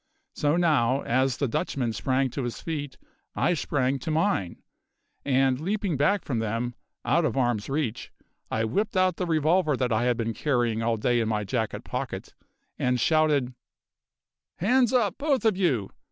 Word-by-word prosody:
So 150 +1 +1
now, 140 -6 +2
as 130 +1 +1
the 140 - 0
Dutchman 120 0 -2
sprang 130 +3 0
to 140 - -3
his 120 -2 -4
feet 145 -4 -5 0.4
I 175 - +2
sprang 135 -4 0
to 145 - -5
mine, 160 - 0 0.6
and, 130 -1 +2
leaping 195 0 -1
back 160 +9 +1
from 125 -5 -1
them, 115 +2 -2 0.3
out 170 - +3
of 155 - -1
arms' 120 -4 0
reach, 135 -5 -2 0.4
I 110 0 0
whipped 200 - -1
out 185 -2 +2
the 180 - -2
revolver 155 -1 +2
that 125 -2 0
I 115 +2 +1
had 125 -1 +1
been 115 -1 -2
carrying 120 -5 0
all 115 0 +1
day 120 +3 +1
in 110 -1 0
my 105 -1 0
jacket 110 +1 -2
pocket, - - -5 0.5
and 125 0 +1
shouted: 150 -3 +2 1.0
"Hands 245 +5 +3
up, 230 -6 +1
both 280 -5 +1
of 220 -3 +4
you! 135 - 0
135 Hz, 170 wpm, -26 LUFS, 120-165 Hz, 1.0 s, of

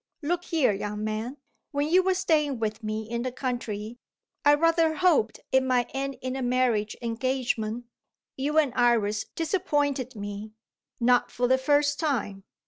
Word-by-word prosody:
"Look 350 +4 -1
here, 315 -9 +2
young 210 +1 -4
man. 215 +5 -3 0.3
When 285 0 -1
you 360 +4 +5
were 375 0 +1
staying 310 -7 +1
with 220 0 -3
me 215 0 -3
in 235 +1 -3
the 255 +1 -2
country, 240 -3 -4 0.4
I 290 0 +6
rather 330 0 +3
hoped 315 -11 +2
it 265 - +5
might 255 -2 +1
end 270 0 -3
in 255 0 -2
a 265 - -3
marriage 245 -4 +1
engagement. 235 -1 -1 0.5
You 290 +3 -1
and 290 -6 +3
Iris 220 -3 +2
disappointed 290 -7 0
me 205 +1 -6 0.5
not 245 +1 +3
for 245 0 0
the 260 +1 +3
first 290 +1 +2
time. 225 - -1
255 Hz, 155 wpm, -27 LUFS, 220-290 Hz, 0.5 s, I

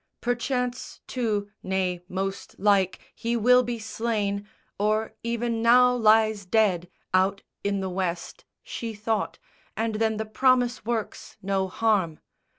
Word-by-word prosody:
Perchance 250 +1 -2
too, 210 -5 -2
nay, 185 -2 -1
most 195 +1 -4
like, 195 -2 +3 0.2
he 235 +1 -1
will 250 +3 +6
be 240 -1 -3
slain 215 -2 -2 0.3
Or 215 +1 +1
even 235 0 -1
now 250 +2 +6
lies 220 -3 +4
dead, 185 -3 +2 0.2
out 190 +1 +2 0.2
in 200 -1 0
the 190 - -2
West, 180 -2 -3 0.2
She 225 -2 -5
thought, 215 +1 -2 0.4
and 225 0 0
then 220 -1 +1
the 220 - -2
promise 250 +2 +2
works 230 -3 -3
no 190 0 0
harm. 190 -6 +1
215 Hz, 130 wpm, -26 LUFS, 195-235 Hz, 0.4 s, will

